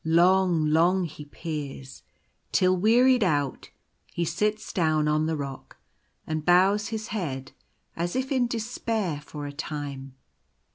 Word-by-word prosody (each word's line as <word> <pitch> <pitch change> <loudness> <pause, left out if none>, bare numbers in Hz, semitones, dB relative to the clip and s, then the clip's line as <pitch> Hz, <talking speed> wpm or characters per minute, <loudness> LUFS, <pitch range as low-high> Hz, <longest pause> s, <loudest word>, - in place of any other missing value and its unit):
Long, 175 0 +4
long 170 +5 +3
he 155 -3 -7
peers, 145 -3 -7 0.5
till, 185 0 +3
wearied 240 +5 +4
out, 145 -7 -1 0.4
he 170 - -1
sits 210 +5 -1
down 155 -4 +2
on 155 +1 +2
the 160 -1 -1
rock 140 -2 -7 0.5
and 155 -1 -3
bows 190 +5 +4
his 220 -1 -5
head 135 -10 -4 0.4
as 175 +1 -2
if 260 +1 -2
in 255 -3 +2
despair 220 -8 -2
for 150 0 -7
a 145 - -6
time. 140 -3 -6
170 Hz, 135 wpm, -26 LUFS, 150-210 Hz, 0.5 s, Long